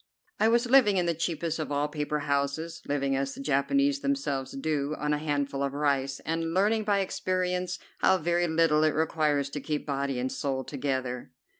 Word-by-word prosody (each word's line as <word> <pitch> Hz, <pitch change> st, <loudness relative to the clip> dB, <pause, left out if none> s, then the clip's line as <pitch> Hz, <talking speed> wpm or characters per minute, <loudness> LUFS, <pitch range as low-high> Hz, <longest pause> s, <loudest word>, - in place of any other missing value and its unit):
I 220 Hz, -, +4 dB
was 235 Hz, +2 st, +3 dB
living 240 Hz, -6 st, +5 dB
in 180 Hz, -, +2 dB
the 170 Hz, -, +1 dB
cheapest 165 Hz, 0 st, -2 dB
of 155 Hz, -, -3 dB
all 145 Hz, +1 st, +1 dB
paper 150 Hz, 0 st, -2 dB
houses, 140 Hz, +4 st, -1 dB
living 140 Hz, -1 st, 0 dB
as 135 Hz, 0 st, -2 dB
the -, -, -10 dB
Japanese 275 Hz, -, +2 dB
themselves 275 Hz, -, -1 dB
do, 145 Hz, +1 st, -1 dB
on 150 Hz, 0 st, 0 dB
a 150 Hz, -, 0 dB
handful 145 Hz, -2 st, -1 dB
of 140 Hz, -1 st, -1 dB
rice, 140 Hz, -2 st, 0 dB
and 165 Hz, +1 st, -2 dB
learning 210 Hz, +3 st, +2 dB
by 200 Hz, -2 st, +2 dB
experience 180 Hz, -1 st, -1 dB, 0.2 s
how 190 Hz, -, +4 dB
very 175 Hz, +1 st, +1 dB
little 160 Hz, -1 st, +3 dB
it 155 Hz, -1 st, +2 dB
requires 150 Hz, -3 st, +1 dB
to 145 Hz, -, -4 dB
keep 150 Hz, +1 st, -3 dB
body 140 Hz, -2 st, -1 dB
and 130 Hz, +1 st, -2 dB
soul 135 Hz, -2 st, -2 dB
together. 130 Hz, -3 st, -3 dB
150 Hz, 185 wpm, -28 LUFS, 140-175 Hz, 0.2 s, living